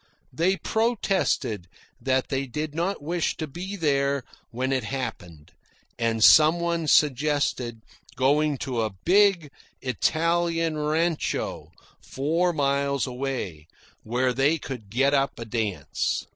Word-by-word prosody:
They 180 +8 +1
protested 195 - 0 0.3
that 130 -1 0
they 135 0 -1
did 150 +4 -4
not 170 +1 -2
wish 170 +2 -1
to 155 - -3
be 180 +7 -6
there 140 -5 +1 0.3
when 130 +3 -2
it 130 -2 0
happened, 95 - -6 0.5
and 115 -1 +1
some 155 +6 +7
one 170 -2 -1
suggested 140 -6 +1 0.3
going 145 +2 +2
to 125 -4 -1
a 110 -3 -3
big 185 -5 +4 0.3
Italian 165 +5 0
rancho 155 +2 -1 0.3
four 165 +6 0
miles 140 -2 0
away, 125 - -4 0.3
where 125 +3 0
they 140 +6 +2
could 125 -8 -8
get 135 +6 +2
up 140 -1 +1
a 115 - -6
dance. 110 -3 -2
140 Hz, 120 wpm, -25 LUFS, 125-165 Hz, 0.5 s, some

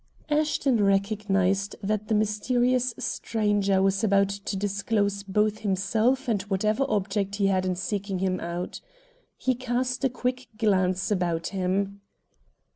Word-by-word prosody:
Ashton 295 -6 +2
recognized 195 -1 +1
that 210 +1 -1
the 220 - +1
mysterious 245 +4 +1
stranger 205 -3 0
was 195 +2 +1
about 200 -2 +3
to 200 0 -4
disclose 200 0 0
both 210 +2 0
himself 220 +6 +1
and 215 -5 +1
whatever 215 +6 0
object 200 0 -1
he 200 -1 +1
had 190 -1 +2
in 185 - 0
seeking 195 +1 -3
him 185 0 0
out. 170 +1 -5 0.6
He 260 - +1
cast 250 +1 -2
a 265 - +3
quick 255 +1 -3
glance 185 -3 +1
about 175 -4 0
him. 195 +1 -1
200 Hz, 130 wpm, -26 LUFS, 195-225 Hz, 0.6 s, about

